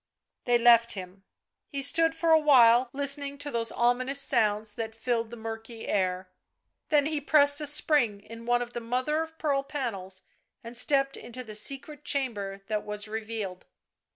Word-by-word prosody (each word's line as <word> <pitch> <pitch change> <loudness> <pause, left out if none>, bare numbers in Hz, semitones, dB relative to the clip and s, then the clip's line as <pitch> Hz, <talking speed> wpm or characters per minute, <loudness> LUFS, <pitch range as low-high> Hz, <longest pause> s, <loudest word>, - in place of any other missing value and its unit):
They 245 -1 +4
left 235 -1 +5
him; 190 0 -9 0.4
he 280 -2 -4
stood 325 +3 +3
for 330 0 +1
a 320 - +7
while 250 -4 +6
listening 280 +1 -3
to 290 0 -5
those 230 -2 -2
ominous 255 +3 +1
sounds 210 -5 +1
that 225 0 -5
filled 230 -1 -1
the 235 - -9
murky 225 +1 -7
air, 185 -1 -1 0.6
then 295 -2 +3
he 305 -1 -2
pressed 285 0 +4
a 300 - -3
spring 285 -8 +2
in 230 +2 -11
one 245 0 +2
of 240 0 -11
the 240 - -3
mother 255 +7 -1
of 320 0 -7
pearl 285 -4 0
panels 200 -10 -5 0.4
and 230 +1 -8
stepped 275 +2 +1
into 255 +1 -7
the 220 -3 -10
secret 275 +7 -3
chamber 205 -9 -3
that 210 0 -2
was 210 0 -6
revealed. 215 -4 -5
240 Hz, 170 wpm, -28 LUFS, 220-280 Hz, 0.6 s, a